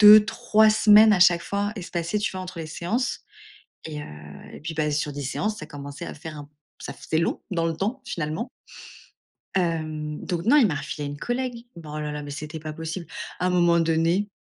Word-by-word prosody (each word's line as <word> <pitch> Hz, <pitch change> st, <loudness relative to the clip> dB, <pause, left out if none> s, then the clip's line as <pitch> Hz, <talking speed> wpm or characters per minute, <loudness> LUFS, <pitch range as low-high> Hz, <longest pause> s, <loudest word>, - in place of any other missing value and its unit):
2-3 215 Hz, +1 st, +7 dB
semaines 215 Hz, 0 st, +7 dB
à 190 Hz, -, +3 dB
chaque 175 Hz, -1 st, +6 dB
fois 200 Hz, +1 st, -1 dB
espacées, 175 Hz, 0 st, -2 dB
tu 205 Hz, -, 0 dB
vois, 185 Hz, -, -5 dB
entre 185 Hz, -1 st, -7 dB
les 165 Hz, -, -4 dB
séances 195 Hz, +11 st, -2 dB, 0.6 s
et 150 Hz, -2 st, -5 dB
heu, -, -, -7 dB, 0.5 s
et -, -, -10 dB
puis 160 Hz, +2 st, -5 dB
bah, 150 Hz, -1 st, 0 dB
sur 150 Hz, 0 st, -1 dB
10 145 Hz, 0 st, -5 dB
séances 210 Hz, +10 st, -2 dB
ça 155 Hz, -, -7 dB
commençait 145 Hz, -1 st, -8 dB
à -, -, -6 dB
faire 155 Hz, +1 st, -8 dB
un 145 Hz, -1 st, -9 dB, 0.3 s
ça -, -, -6 dB
faisait 160 Hz, -, -2 dB
long 165 Hz, -, 0 dB
dans 165 Hz, -3 st, 0 dB
le 165 Hz, -, -1 dB
temps 210 Hz, -, -2 dB
finalement 160 Hz, +8 st, -3 dB, 1.1 s
hem, 155 Hz, -3 st, -1 dB
donc 175 Hz, -1 st, -2 dB
non, 290 Hz, +6 st, +6 dB
il 265 Hz, -, +7 dB
m'a 170 Hz, -, 0 dB
refilé 145 Hz, +1 st, -4 dB
à -, -, -3 dB
une 145 Hz, -, -5 dB
collègue 245 Hz, -, -3 dB
bon 155 Hz, -3 st, -9 dB
oh 150 Hz, -, -3 dB
là 150 Hz, 0 st, -3 dB
là 150 Hz, 0 st, -4 dB
mais 145 Hz, -, -7 dB
c'était 155 Hz, +2 st, -6 dB
pas 155 Hz, 0 st, -6 dB
possible 160 Hz, +2 st, -5 dB, 0.3 s
à 180 Hz, -, 0 dB
un -, -, +2 dB
moment 175 Hz, -1 st, +4 dB
donné 165 Hz, +4 st, +2 dB
170 Hz, 215 wpm, -25 LUFS, 155-205 Hz, 1.1 s, 2-3